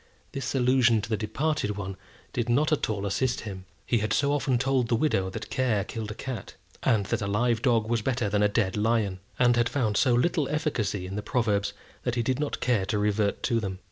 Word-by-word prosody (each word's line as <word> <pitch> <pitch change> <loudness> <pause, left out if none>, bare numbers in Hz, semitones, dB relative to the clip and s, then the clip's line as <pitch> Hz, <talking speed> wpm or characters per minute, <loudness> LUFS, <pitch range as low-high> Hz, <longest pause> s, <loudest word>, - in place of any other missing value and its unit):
This 135 0 -3
allusion 125 -3 +4
to 105 - -5
the 110 - +1
departed 110 +1 -1
one 95 -1 -4 0.4
did 120 -1 -1
not 150 +6 +3
at 155 - +1
all 100 -2 -2
assist 125 +6 0
him. 95 -4 -7 0.2
He 120 - +2
had 110 0 0
so 140 0 +2
often 135 -3 +1
told 130 -1 +1
the 115 - +2
widow 110 -8 +1
that 110 +4 -7
care 120 -7 +1
killed 110 +1 -5
a 105 - -6
cat, 125 -6 -6 0.3
and 105 -4 +2
that - - -1
a 100 - -1
live 115 +3 +1
dog 115 -4 +2
was 115 -1 +1
better 120 -1 0
than 100 0 +1
a 105 - +5
dead 100 -3 0
lion; 105 -3 +1 0.2
and 120 -1 +4
had 120 0 +2
found 120 -6 0
so 125 -1 +4
little 145 +3 +1
efficacy 120 - -1
in 95 +2 -5
the - - -1
proverbs, 105 -2 0 0.3
that 125 -1 -2
he 120 - +1
did 130 +3 0
not 150 -1 -2
care 115 -7 +1
to 105 - 0
revert 105 0 0
to 115 - +2
them. 95 -4 -4
115 Hz, 230 wpm, -27 LUFS, 105-125 Hz, 0.4 s, a